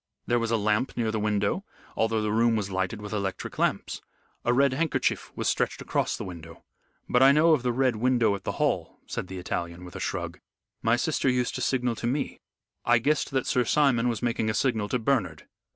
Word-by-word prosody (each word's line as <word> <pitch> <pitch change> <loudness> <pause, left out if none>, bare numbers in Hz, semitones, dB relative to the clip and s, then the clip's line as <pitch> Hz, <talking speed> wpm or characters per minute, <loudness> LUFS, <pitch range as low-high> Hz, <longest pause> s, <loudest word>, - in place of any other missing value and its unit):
There 120 0 +2
was 115 -1 -1
a 115 - +2
lamp 105 +4 0
near 115 -2 0
the 110 - -1
window 105 - 0 0.3
although 110 -1 +1
the 105 - 0
room 115 +1 +3
was 100 -2 -2
lighted 95 +3 -2
with 105 - -6
electric 100 -3 -3
lamps. - - 0 0.4
A 120 - +2
red 135 +2 +3
handkerchief 160 +3 0
was - - -2
stretched - - 0
across - - -1
the - - -5
window. 85 -2 -10 0.4
But 125 - +3
I 135 +1 +8
know 155 +3 +5
of 150 - +2
the 125 0 0
Red 130 -1 +1
Window 120 -2 +3
at 100 - -5
the - - -2
Hall," - - -1
said - - -4
the 95 - -7
Italian, 85 -1 -4
with 90 - -11
a - - -5
shrug. - - -3 0.4
"My 115 +1 +3
sister 135 +1 0
used 125 -1 0
to - - -4
signal 125 -2 +1
to 120 - -2
me. 140 +4 -2 0.4
I 120 0 +4
guessed 145 +7 +1
that 130 -2 -1
Sir 125 - +2
Simon 125 -2 +3
was 115 0 -3
making 115 -2 0
a 110 - -1
signal 110 -6 0
to 125 - +1
Bernard." 110 - -1
115 Hz, 215 wpm, -27 LUFS, 105-125 Hz, 0.4 s, I